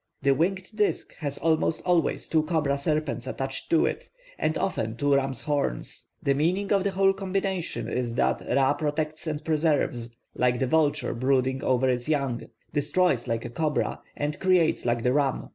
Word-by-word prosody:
The 140 0 +5
winged 185 +6 0
disk 210 -1 0
has 145 -3 -4
almost 160 -1 +1
always 175 -2 +1
two 160 - +3
cobra 155 -3 0
serpents 140 -3 -1
attached 135 0 -4
to 165 - +4
it, - - -3 0.3
and 155 +1 0
often 115 - -2
two 145 +1 +2
rams' 135 -2 0
horns; 145 - -2 0.2
the 140 - +3
meaning 180 +8 0
of 195 -2 +3
the 200 - +1
whole 195 0 +3
combination 195 -2 -2
is 120 -2 -2
that - - +1
Ra 135 0 +3
protects 155 +2 -3
and 155 0 -3
preserves, 145 -7 0 0.2
like 125 -1 +2
the 130 - +1
vulture 150 +2 +1
brooding 130 +1 +1
over 130 0 +2
its 125 +2 -1
young, 140 -6 0 0.3
destroys 145 -2 +1
like 115 0 -1
the - - -6
cobra, 150 +3 -1 0.2
and 145 0 -2
creates 180 -8 +2
like 120 -1 +1
the 125 - +2
ram. 140 -2 0
145 Hz, 175 wpm, -26 LUFS, 130-165 Hz, 0.3 s, The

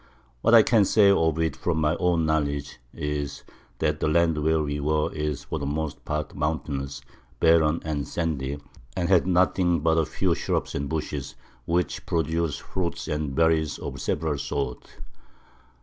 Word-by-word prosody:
What 115 - +5
I 115 - +9
can 110 -2 +4
say 100 0 +5
of 80 -5 +2
it 80 0 0
from 85 -2 -1
my 75 -1 +2
own 85 -3 +1
Knowledge 70 -4 -1
is, 75 -1 -4 0.3
That - - 0
the - - 0
Land 80 0 +2
where 80 0 +2
we 75 0 -2
were 75 +1 0
is 75 -2 -3
for 80 - -4
the 70 - -3
most 75 0 -3
part 75 -1 -3
mountainous, 70 -2 -3 0.4
barren 80 -1 +4
and 75 -3 -2
sandy, 70 -5 -2 0.4
and 90 -1 0
had 90 -2 +4
nothing 90 -2 +2
but 80 +1 +3
a 80 - +1
few - - 0
Shrubs - - -2
and 70 0 -3
Bushes, 75 -3 -4 0.3
which 85 -2 -1
produce 80 -2 0
Fruit 90 +1 -4
and 75 -3 -2
Berries 80 -1 +2
of - - -6
several 75 -2 -1
Sorts. 70 -3 -3
80 Hz, 165 wpm, -25 LUFS, 75-85 Hz, 0.4 s, I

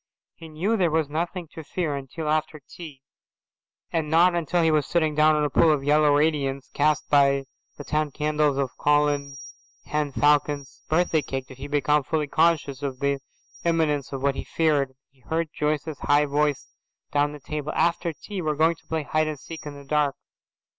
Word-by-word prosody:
He 165 - -12
knew 180 +9 0
there 180 -4 +2
was 160 -2 0
nothing 170 +3 -3
to 160 - -8
fear 155 -1 -2
until 140 +3 -6
after 155 0 -1
tea, 150 -6 -11 0.9
and 160 -2 -1
not 170 +3 +5
until 170 0 0
he 160 - +3
was 150 -2 +1
sitting 160 -3 +1
down 155 +1 +4
in 150 - +1
a 150 - +1
pool 160 - +5
of 145 -3 0
yellow 150 +1 +4
radiance 140 -3 0
cast 150 0 +1
by 140 -1 +4 0.3
the 145 - -7
ten 150 +1 -1
candles 150 -1 0
on 140 -1 +1
Colin 145 -1 +1 0.5
Henne 150 -1 -1
Falcon's 145 -1 +1
birthday 160 -1 +2
cake 135 -2 -4
did 130 0 -14
he 140 - -6
become 150 +1 +2
fully 155 +2 -1
conscious 150 -3 +1
of 135 -2 -3
the 140 0 0 0.4
imminence 155 -5 0
of 135 -1 -5
what 140 0 +2
he - - -5
feared. 145 -5 0 0.2
He 135 - -31
heard 160 +5 -2
Joyce's 150 0 -2
high 145 +1 +3
voice 145 -1 -1 0.4
down 145 0 +2
the 150 - -9
table, 150 +2 -4
"After 170 0 +1
tea 190 +5 -7
we 155 - -1
are 150 - 0
going 160 +2 +2
to 160 - -26
play 160 -1 -2
hide 155 +2 0
and 155 -2 -4
seek 160 +2 -9
in 145 - -7
the 140 0 -12
dark." 145 0 +1
150 Hz, 195 wpm, -25 LUFS, 140-160 Hz, 0.9 s, not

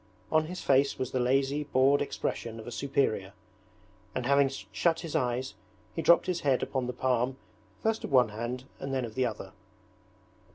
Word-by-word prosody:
On 155 0 +3
his 180 +3 -6
face 140 +1 +3
was 130 - -3
the 130 - 0
lazy, 135 +3 +1
bored 140 0 +3
expression 115 -4 -3
of 110 - -9
a 120 - -7
superior, 125 -9 0 0.8
and 125 - -2
having 140 +1 +4 0.2
shut 165 -1 +1
his 165 -3 -6
eyes 125 +1 0 0.4
he 165 - -1
dropped 170 - +5
his 180 -2 -1
head 135 -5 +2
upon 130 -2 -2
the - - -1
palm 125 +1 0 0.5
first 220 0 0
of - - -5
one 125 -4 +5
hand 120 +4 -4 0.2
and 135 - -4
then 130 -2 0
of 110 - -8
the 130 0 +1
other. 110 -2 -7
130 Hz, 180 wpm, -29 LUFS, 125-140 Hz, 0.8 s, dropped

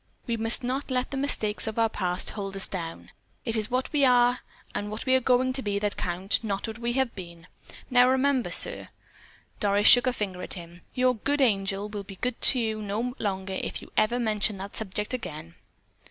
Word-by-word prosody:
We 235 - -1
must 225 +3 +1
not 260 +4 -2
let 250 -1 -1
the - - -3
mistakes 225 -7 +2
of 220 - -4
our 225 0 +3
past 180 -4 -1
hold 195 -2 -5
us 195 - +2
down. 165 -3 -7 0.3
It 225 -2 0
is 215 0 -1
what 255 +3 -2
we 290 -2 +2
are, 245 -1 +4 0.3
and 205 0 -3
what 215 +1 -6
we 260 - +2
are 260 - +5
going 255 +1 +2
to 265 - -2
be 205 -4 -2
that 205 0 -1
count, 185 +5 0
not 200 0 -3
what 225 +1 -7
we 240 0 -1
have 265 -2 0
been. 170 -3 -10 0.5
Now, 250 0 +6
remember, 265 0 +1
sir," - - +4 0.7
Doris 205 0 +1
shook 245 +1 +7
a 255 - +2
finger 190 -6 -4
at - - -2
him, 175 0 -11
"your 255 0 +3
'good 285 +7 0
angel' 200 -5 +1
will 205 -1 -6
be 195 0 -10
good 245 +4 -4
to 255 - +5
you 220 -2 -2
no 215 +4 -3
longer 190 -2 -3
if - - -5
you - - -14
ever 215 +3 +2
mention 215 -3 0
that 195 +1 -8
subject 210 +2 -1
again." 165 -9 -6
220 Hz, 210 wpm, -26 LUFS, 195-250 Hz, 0.7 s, shook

